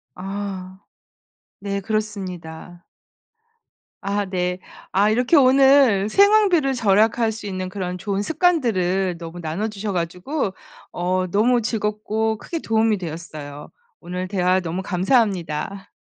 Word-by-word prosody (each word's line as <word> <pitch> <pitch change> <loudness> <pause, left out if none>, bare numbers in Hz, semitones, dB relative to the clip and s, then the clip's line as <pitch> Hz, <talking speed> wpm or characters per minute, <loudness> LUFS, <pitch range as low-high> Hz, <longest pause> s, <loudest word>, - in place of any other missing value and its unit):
아. 190 -1 -6 0.8
네 200 0 -3
그렇습니다. 185 -5 -5 1.2
아 200 +1 -1
네. 180 -1 -2 0.3
아 200 +3 +3
이렇게 245 +8 +3
오늘 265 -6 +5
생활비를 395 - +4
절약할 225 0 +2
수 215 -1 -8
있는 185 -2 -4
그런 185 -2 -4
좋은 195 +2 -2
습관들을 205 - +1
너무 170 +1 -8
나눠 170 +7 -3
주셔 210 -1 -4
가지고 185 - -2 0.4
어 185 +1 -1
너무 235 +6 +3
즐겁고 215 0 -1
크게 330 +8 -5
도움이 225 -3 +2
되었어요. 155 -4 -8 0.3
오늘 180 +1 -5
대화 185 -1 +1
너무 175 +1 -4
감사합니다. 190 - 0
200 Hz, 255 characters per minute, -22 LUFS, 180-225 Hz, 1.2 s, 오늘